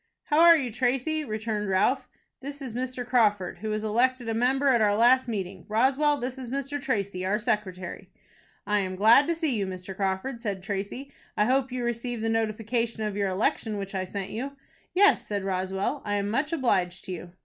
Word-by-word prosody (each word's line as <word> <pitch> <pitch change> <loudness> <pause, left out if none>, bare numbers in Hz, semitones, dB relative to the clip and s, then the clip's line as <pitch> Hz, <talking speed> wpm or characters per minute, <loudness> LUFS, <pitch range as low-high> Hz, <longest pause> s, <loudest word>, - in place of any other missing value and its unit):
"How 300 - +1
are 335 0 +8
you, 255 -5 -2
Tracy?" 265 +6 0
returned 215 -4 -3
Ralph. 190 0 +1 0.3
"This 285 +1 -7
is 260 -5 -6
Mr. 250 0 -3
Crawford, 210 -7 +2
who 215 - -4
was 215 0 -2
elected 245 +3 +1
a 225 - 0
member 260 +4 +2
at 240 -4 +4
our 205 -1 +3
last 250 +4 +5
meeting. 190 -5 -4
Roswell, 270 +7 +3
this 255 0 -4
is 250 -2 -7
Mr. 275 +2 -3
Tracy, 200 -8 -2
our 195 +3 +1
secretary." 210 -6 -3 0.6
"I 210 0 +2
am 185 -1 -2
glad 225 +9 +6
to 335 - +1
see 320 -6 0
you, 200 -3 -1
Mr. 185 +1 -7
Crawford," 195 +6 -2
said 200 -5 -3
Tracy. 205 +7 -4 0.3
"I 210 - +4
hope 260 +2 +1
you 250 -1 -3
received 240 -1 -3
the 225 - +1
notification 225 +1 -1
of 210 -2 -2
your 200 -1 0
election 210 +2 -1
which 195 0 -5
I 190 -1 -2
sent 195 +1 -5
you." 270 +5 -4 0.4
"Yes," 405 +2 +4
said 205 -2 -2
Roswell. 190 +7 -2
"I 205 -1 -1
am 205 0 -1
much 280 +7 0
obliged 185 - 0
to - - -6
you." 175 0 -7
225 Hz, 200 wpm, -27 LUFS, 200-260 Hz, 0.6 s, are